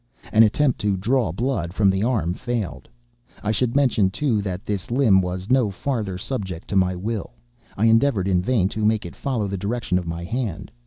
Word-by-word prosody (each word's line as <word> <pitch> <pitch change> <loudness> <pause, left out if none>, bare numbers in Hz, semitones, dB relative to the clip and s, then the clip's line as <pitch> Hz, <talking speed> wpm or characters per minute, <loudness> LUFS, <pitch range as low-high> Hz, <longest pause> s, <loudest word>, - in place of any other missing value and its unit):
An 110 - +6
attempt 125 +4 +3
to 100 -2 +1
draw 115 +1 +1
blood 95 -4 -2
from 100 -3 +4
the 95 +1 -1
arm 110 -8 0
failed. 105 - -4 0.5
I 105 - 0
should 115 +3 0
mention, 125 -9 +3
too, 115 0 0
that 95 +1 -5
this 100 -3 -3
limb 120 -6 +4
was 90 +4 -4
no 130 -5 +4
farther 105 -2 -3
subject 95 -5 -5
to 100 - -2
my 95 -1 +3
will. 105 - -4 0.4
I 105 - +2
endeavored 115 -3 +3
in 90 -2 +2
vain 100 -2 +2
to 110 0 -4
make 110 -1 +2
it 85 - -8
follow 120 -7 -2
the 100 -1 -4
direction 105 -3 -1
of 90 - -7
my 85 +1 -4
hand. 110 -3 -4
105 Hz, 200 wpm, -23 LUFS, 95-120 Hz, 0.5 s, An